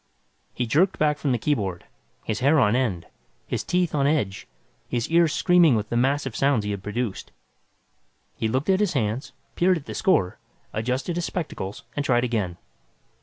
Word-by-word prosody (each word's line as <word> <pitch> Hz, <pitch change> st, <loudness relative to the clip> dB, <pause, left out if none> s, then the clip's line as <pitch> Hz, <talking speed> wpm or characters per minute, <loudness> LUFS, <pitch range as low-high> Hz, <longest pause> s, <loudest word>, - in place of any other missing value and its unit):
He 125 Hz, -, -1 dB
jerked 165 Hz, -, +2 dB
back 150 Hz, -1 st, +1 dB
from 140 Hz, -, 0 dB
the 125 Hz, -, +2 dB
keyboard, 105 Hz, -, -1 dB, 0.4 s
his 110 Hz, -, -2 dB
hair 145 Hz, +4 st, +4 dB
on 115 Hz, -3 st, +3 dB
end, 110 Hz, -10 st, 0 dB, 0.4 s
his -, -, -3 dB
teeth, 180 Hz, -1 st, 0 dB
on 140 Hz, -2 st, +2 dB
edge, 120 Hz, -11 st, -1 dB, 0.4 s
his 120 Hz, -1 st, -1 dB
ears 165 Hz, -1 st, +4 dB
screaming 175 Hz, -6 st, +4 dB
with 110 Hz, -1 st, -2 dB
the -, -, -2 dB
mass 135 Hz, +4 st, +2 dB
of 135 Hz, -, -5 dB
sounds 135 Hz, -6 st, +2 dB
he 105 Hz, -, -2 dB
had 100 Hz, -1 st, -4 dB
produced. 105 Hz, +1 st, -4 dB, 1.0 s
He 110 Hz, -, -1 dB
looked 130 Hz, -, +1 dB
at 190 Hz, -, +3 dB
his 205 Hz, -3 st, +1 dB
hands, 115 Hz, -1 st, -1 dB, 0.2 s
peered 180 Hz, +1 st, +3 dB
at 150 Hz, -, -9 dB
the -, -, -6 dB
score, 165 Hz, -, +1 dB, 0.3 s
adjusted 125 Hz, +10 st, -2 dB
his 175 Hz, -, -1 dB
spectacles 105 Hz, -, -5 dB
and 145 Hz, -, -1 dB
tried 120 Hz, -3 st, +2 dB
again. 105 Hz, -8 st, -1 dB
130 Hz, 180 wpm, -24 LUFS, 110-155 Hz, 1.0 s, hair